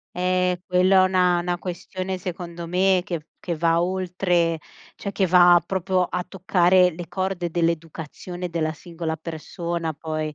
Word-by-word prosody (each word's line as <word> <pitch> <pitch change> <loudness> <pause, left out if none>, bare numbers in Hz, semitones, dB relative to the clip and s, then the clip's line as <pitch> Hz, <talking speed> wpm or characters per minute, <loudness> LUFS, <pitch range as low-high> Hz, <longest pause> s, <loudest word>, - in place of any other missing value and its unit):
Eh, 180 0 +1
quello 185 +1 +3
è 185 - +7
una 180 -1 +3
una 175 0 -1
questione, 185 +1 -5
secondo 175 -1 -6
me, 185 +2 +3
che 165 -5 -5
che 175 - -3
va 165 +1 +2
oltre, 180 -2 0 0.4
cioè 200 - -5
che 195 - +1
va 175 -1 +7
proprio 185 0 0
a 180 0 -3
toccare, 185 -1 +3
le 175 +1 -7
corde 185 -1 -2
dell'educazione 170 +1 -3
della 160 -2 -1
singola 165 0 -5
persona 165 +1 -4
poi. 155 0 -4
175 Hz, 145 wpm, -23 LUFS, 170-185 Hz, 0.4 s, è